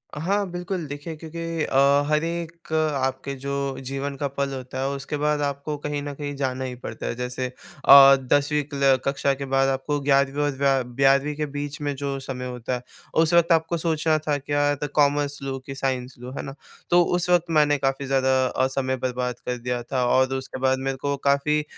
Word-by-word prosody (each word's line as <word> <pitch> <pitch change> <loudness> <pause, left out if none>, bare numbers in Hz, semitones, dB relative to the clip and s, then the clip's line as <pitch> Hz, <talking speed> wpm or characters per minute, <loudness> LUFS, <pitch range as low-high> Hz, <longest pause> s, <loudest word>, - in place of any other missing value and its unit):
हाँ। 195 +6 0
बिल्कुल 180 -1 -4
देखिए 145 +3 -6
क्योंकि 165 0 -4
अ, 140 +1 +4
हर 150 +1 +2
एक 170 -1 -5
अ, - - +3 0.3
आपके 135 +1 -3
जो 140 -1 -2
जीवन 140 +1 -3
का 140 - -1
पल 140 0 -3
होता 130 0 -6
है 135 - 0
उसके 140 +1 -4
बाद 150 0 +1
आपको 140 +1 -2
कहीं 145 0 -3
न 145 - -5
कहीं 145 0 -5
जाना 130 -1 -2
ही 125 - -5
पड़ता 120 -2 -7
है। - - -2
जैसे 125 +1 -3
अ, 135 +2 +6 0.2
10वीं 145 +1 +2
क्ला 140 -1 +2
कक्षा 140 0 +1
के 140 0 -5
बाद 135 0 +4
आपको 140 +2 -1
11वीं 140 +1 +2
और 145 - +1
व 135 -2 +3 0.2
12वीं 140 +2 +3
के 150 0 -2
बीच 145 0 -5
में 145 -1 -1
जो 140 0 -3
समय 130 -1 -6
होता 125 0 -3
है 125 - -7 0.3
उस 160 +1 +3
वक़्त 170 0 +4
आपको 165 +1 +2
सोचना 160 -1 +1
था 145 -1 +2
क्या 145 +1 +1
द - - 0
कॉमर्स 145 -1 +2
लूँ, 135 -1 -3
कि 135 - -7
साइंस 130 -2 -2
लूँ, 125 +2 -8
है - - -2
ना? 135 0 -7 0.3
तो 175 0 +6
उस 180 +1 -1
वक़्त 175 -1 +4
मैंने 145 -1 +4
काफ़ी 135 0 -1
ज़्यादा 130 -1 +2
अ, 130 +1 +1
समय 130 0 -1
बर्बाद 125 -1 -2
कर 125 0 -2
दिया 120 0 -3
था 125 0 -1
और 130 +1 +3
उसके 130 0 -5
बाद 130 0 +2
मेरे 135 0 -2
को 140 +1 -1
काफ़ी 150 +2 +2
140 Hz, 210 wpm, -24 LUFS, 130-150 Hz, 0.3 s, अ